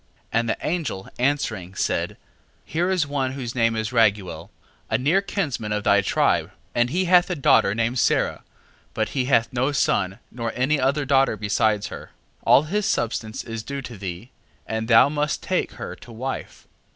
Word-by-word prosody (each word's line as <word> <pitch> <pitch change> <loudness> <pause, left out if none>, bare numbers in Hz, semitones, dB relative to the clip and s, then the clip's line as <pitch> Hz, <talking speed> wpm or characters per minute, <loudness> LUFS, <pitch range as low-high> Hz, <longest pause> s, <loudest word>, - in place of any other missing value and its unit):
6:11. 115 - +4
And 115 -1 -1
the - - 0
angel 150 - -2
answering, 110 -9 -1
said: - - -1 0.5
Here 175 +3 -1
is 185 -4 +2
one 135 -2 -2
whose 125 -4 -5
name 115 -2 +2
is 110 +2 -2
Raguel, 100 -8 +1 0.4
a - - +2
near 155 +10 +2
kinsman 145 - -3
of 105 -1 -1
thy 100 0 +4
tribe, - - +1 0.2
and 120 0 +2
he 185 +7 0
hath 180 +1 +5
a 180 - -1
daughter 105 -8 +4
named 115 +2 0
Sara, - - +1 0.5
but 110 - 0
he 130 -3 -1
hath 125 -2 +2
no 130 +4 +1
son 95 -8 +1
nor 115 -2 -3
any 135 +4 +1
other 140 +3 +1
daughter 135 -4 +3
beside 105 0 +1
her. - - -7 0.3
6:12. - - -36
All 140 - +7
his 200 +6 -1
substance 110 -1 -2
is 115 -1 -5
due 140 +3 -5
to 120 -2 -8
thee, 95 +4 -7 0.3
and 110 0 -3
thou 115 +2 +7
must 150 +1 -1
take - - -1
her - - -7
to 120 - -14
wife. 130 +4 -6
120 Hz, 185 wpm, -23 LUFS, 110-145 Hz, 0.5 s, All